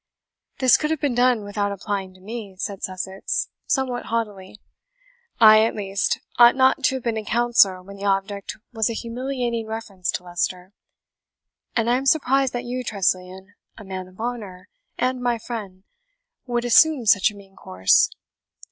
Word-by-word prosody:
"This 255 -3 +5
could 305 - -2
have 320 -1 -1
been 280 -3 0
done 245 -2 +2
without 205 0 -2
applying 195 -1 -4
to - - -18
me," 210 -1 -7
said 195 +1 -5
Sussex, 190 +1 -3 0.2
somewhat 260 -3 -1
haughtily. 210 -3 -4 0.8
"I 215 -1 +8
at 225 - 0
least, 195 -1 -1 0.2
ought 240 0 +8
not 260 0 +3
to 265 - +2
have 260 - -5
been 230 -2 -1
a 220 - -3
counsellor 215 -5 +3
when 200 +1 -11
the 200 - -6
object 195 0 -2 0.2
was 220 -1 +1
a - - -2
humiliating 240 -1 -3
reference 215 -5 -5
to - - -4
Leicester; 180 +1 -3 1.0
and 230 -1 +1
I 240 +1 +3
am 270 +1 -3
suprised 270 -3 +3
that 245 0 -4
you, 250 +1 -4
Tressilian, 190 -2 -2 0.2
a 215 - -10
man 190 -1 -6
of 185 +2 -19
honour, 215 -6 -6 0.3
and 255 0 -1
my 245 -1 0
friend, 205 -5 -7 0.6
would 240 0 -1
assume 270 +1 +5
such 200 -1 +5
a 210 - -12
mean 195 -1 -16
course. 95 - +3
220 Hz, 165 wpm, -23 LUFS, 195-245 Hz, 1.0 s, I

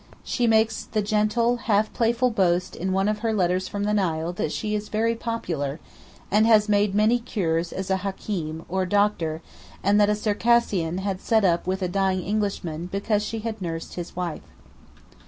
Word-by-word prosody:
She 240 -2 0
makes 220 -1 +2
the 215 -2 -1
gentle, 215 +3 +1
half 215 -2 +1
playful 235 +2 +2
boast 185 -3 +1
in 185 +2 -2
one 195 +1 +1
of 210 0 0
her 225 0 0
letters 185 -1 +1
from 205 -1 -3
the 210 +1 +1
Nile 170 -4 0
that 155 - -2
she 215 -1 -2
is 210 0 -3
"very 225 +2 +1
popular," 170 - -3 0.5
and 215 +3 +4
has 215 -2 +5
made 205 -1 +2
many 220 +4 +4
cures 175 -8 -1
as 190 0 -4
a 190 - +3
Hakeem, 180 -4 -4
or 185 +1 -1
doctor, 180 -6 +1 0.4
and 205 +1 +4
that 205 - +4
a 210 - +2
Circassian 210 -5 +1
had 195 -1 -3
sat 220 -3 +2
up 170 -1 +1
with 190 +1 -1
a - - +1
dying 190 0 0
Englishman 185 -5 -2
because 205 +2 0
she 220 +1 -4
had 220 -2 -5
nursed 165 -2 -5
his 175 -1 -7
wife. 175 -3 -3
200 Hz, 185 wpm, -24 LUFS, 180-215 Hz, 0.5 s, has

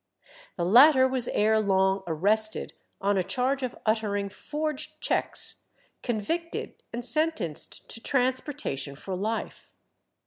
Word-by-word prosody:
The 170 - -1
latter 260 - +7
was 255 -2 -1
ere 220 +1 +2
long 190 -1 +1
arrested 210 +7 +1 0.3
on 200 0 +1
a - - +1
charge 260 +7 -1
of 255 -2 -4
uttering 210 -2 0
forged 305 +5 -5
cheques, - - +1 0.4
convicted, 320 +9 -3 0.2
and 240 +1 -4
sentenced 245 - +2
to 230 - -3
transportation 255 - -1
for 185 +6 -6
life. 215 +5 -4
225 Hz, 115 wpm, -27 LUFS, 195-265 Hz, 0.4 s, latter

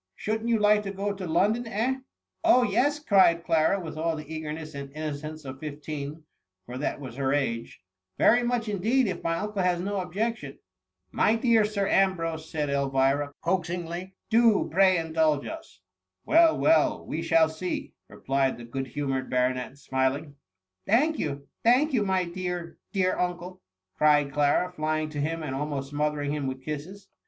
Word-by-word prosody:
Shouldn't 220 +2 -2
you 230 - +3
like 210 0 +4
to 195 -1 -5
go 200 +1 -2
to 190 -2 -6
London, 215 +9 +1
eh 225 +4 0
?^ 265 - -9 0.4
Oh, 255 -7 +5
yes," 285 +4 +2
cried 190 - +4
Clara, 165 +4 +2
with 160 -3 -7
all 165 0 0
the 155 -1 -7
eager 155 -1 -5
ness 155 0 -7
and 140 -1 -7
innocence 155 0 -5
of 130 0 -7
fifteen, 150 0 -6 0.4
for 125 +1 -7
that 145 - -2
was 130 -3 -8
her 135 -1 0
age; 130 -9 -2 0.3
^* - - -49
very 240 +2 +5
much 240 -1 -1
indeed, 220 +5 +1
if 180 -3 -3
my 165 0 0
uncle 210 0 -2
has 180 -1 +1
no 200 +2 -2
objection." 210 +6 -3 0.3
" - - -52
My 220 - +5
dear 230 -1 +3
Sir 205 -2 -1
Ambrose," 165 -5 +1
said 150 -2 -2
Elvira, 140 +1 +1
coax 175 -1 0
ingly, 175 +2 -5
" - - -54
do 225 -2 +4
pray 185 +1 +5
indulge 160 -3 +1
us." 325 0 -9 0.2
" - - -54
Well, 325 0 +5
well, 320 0 +3
we 160 - -3
shall 165 -1 +4
see," 160 +3 -4
replied 135 0 -1
the 120 - -9
good 135 +3 -4
humoured 135 -1 -3
baronet, 125 +1 0
smiling. 130 +2 -1
*^ 145 - -16 0.5
Thank 290 +9 +3
you, 140 -2 -3 0.2
thank 260 +6 +4
you, 225 -5 +2
my 190 -2 +1
dear, 175 -1 -5
dear 185 -2 +1
un 180 -1 0
cle 180 +1 -10 0.2
!" 95 0 -52
cried 145 -2 +4
Clara, 145 +5 +2
flying 155 0 -1
to 145 -1 -4
him, 165 +2 -2
and 140 -3 -4
almost 140 0 -4
smo 150 +1 +1
thering 145 -1 -3
him 145 -2 -2
with 130 0 -5
kisses. 175 +7 -6
165 Hz, 190 wpm, -27 LUFS, 145-200 Hz, 0.5 s, Oh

